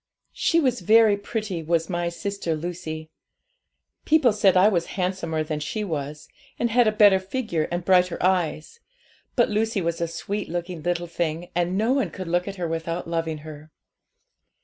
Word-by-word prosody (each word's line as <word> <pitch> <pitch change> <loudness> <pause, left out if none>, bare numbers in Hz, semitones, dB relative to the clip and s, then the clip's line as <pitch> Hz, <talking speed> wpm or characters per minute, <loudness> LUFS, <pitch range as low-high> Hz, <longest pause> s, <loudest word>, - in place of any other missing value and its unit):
She 335 - +2
was 255 -5 +1
very 220 +2 +5
pretty, 205 -3 -4
was 165 0 0
my 175 -1 -1
sister 185 -1 -3
Lucy. 160 -1 -6 0.9
People 300 -7 +4
said 195 -3 +4
I 185 +3 +6
was 175 -5 +1
handsomer 180 -4 -1
than 155 -1 -3
she 210 +8 -3
was, 150 -4 -5 0.3
and 235 -1 0
had 240 0 +4
a - - +4
better 205 -3 +6
figure 190 -5 -2
and 175 0 -3
brighter 180 -1 +3
eyes; 180 - 0 0.6
but 240 - +3
Lucy 220 +1 0
was 170 -1 -2
a 170 - +1
sweet 170 +6 -4
looking 175 0 -4
little 175 +1 -1
thing, 170 0 -3
and 175 +2 0
no 225 +5 +2
one 270 -1 +1
could 185 -2 -7
look 175 +2 0
at 200 - -5
her 175 -3 -3
without 165 +1 -3
loving 165 -1 -2
her. 155 0 -10
175 Hz, 170 wpm, -24 LUFS, 165-205 Hz, 0.9 s, I